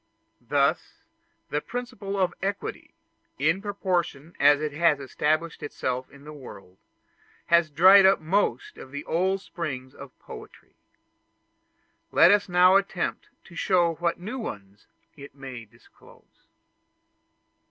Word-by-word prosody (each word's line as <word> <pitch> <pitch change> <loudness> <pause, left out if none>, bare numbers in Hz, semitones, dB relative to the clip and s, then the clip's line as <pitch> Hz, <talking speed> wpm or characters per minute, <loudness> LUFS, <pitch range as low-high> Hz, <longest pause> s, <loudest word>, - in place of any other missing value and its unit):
Thus - - +1 0.6
the 150 - -1
principle 240 -4 -6
of 180 -2 +1
equality; 200 +1 -5 0.4
in 160 +7 +1
proportion 180 -6 -3
as 145 +1 +5
it 155 0 -3
has 155 -1 +2
established 155 +4 -2
itself 130 -3 -4
in 140 0 -17
the 150 +1 -10
world, 100 -10 -13 0.7
has 170 -1 +3
dried 190 +6 +7
up 195 - +4
most 205 - -1
of - - -11
the 145 +2 -7
old 190 +3 0
springs 130 -9 -6
of 140 -2 -13
poetry. 435 -2 -13 1.4
Let 175 - +6
us 205 -1 +2
now 180 +2 +6
attempt 195 -2 -3
to 170 - -16
show 175 -2 +2
what 170 +1 -2
new 215 +9 -6
ones 100 - -9 0.3
it 140 -2 -13
may 130 -4 -9
disclose. 105 - -23
170 Hz, 125 wpm, -25 LUFS, 140-195 Hz, 1.4 s, dried